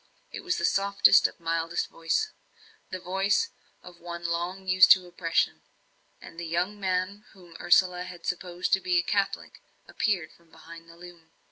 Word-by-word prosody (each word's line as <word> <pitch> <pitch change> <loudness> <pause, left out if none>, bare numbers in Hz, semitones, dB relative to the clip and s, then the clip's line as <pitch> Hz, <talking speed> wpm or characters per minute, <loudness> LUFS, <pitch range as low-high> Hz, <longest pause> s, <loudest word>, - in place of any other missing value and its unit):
It - - -7
was 360 -1 -1
the - - 0
softest, 200 0 +4
mildest 165 0 -2
voice 165 - -2 0.6
the 185 - -5
voice 195 - 0 0.3
of 175 -1 -14
one 170 0 -8
long 175 +3 -3
used 185 0 +6
to 185 -1 -5
oppression; 175 -1 -1 0.6
and 165 - -12
the 170 - -5
young 180 +5 -2
man 190 +2 -2
whom 175 -3 -17
Ursula 180 0 +3
had 175 -2 -11
supposed 180 0 -3
to 190 - +5
be 180 -1 +1
a 175 - +2
Catholic 200 +1 -2 0.3
appeared 180 -7 -1
from 170 -1 -25
behind 165 +1 -14
the 170 - -15
loom. 175 -2 -14
180 Hz, 160 wpm, -27 LUFS, 170-190 Hz, 0.6 s, used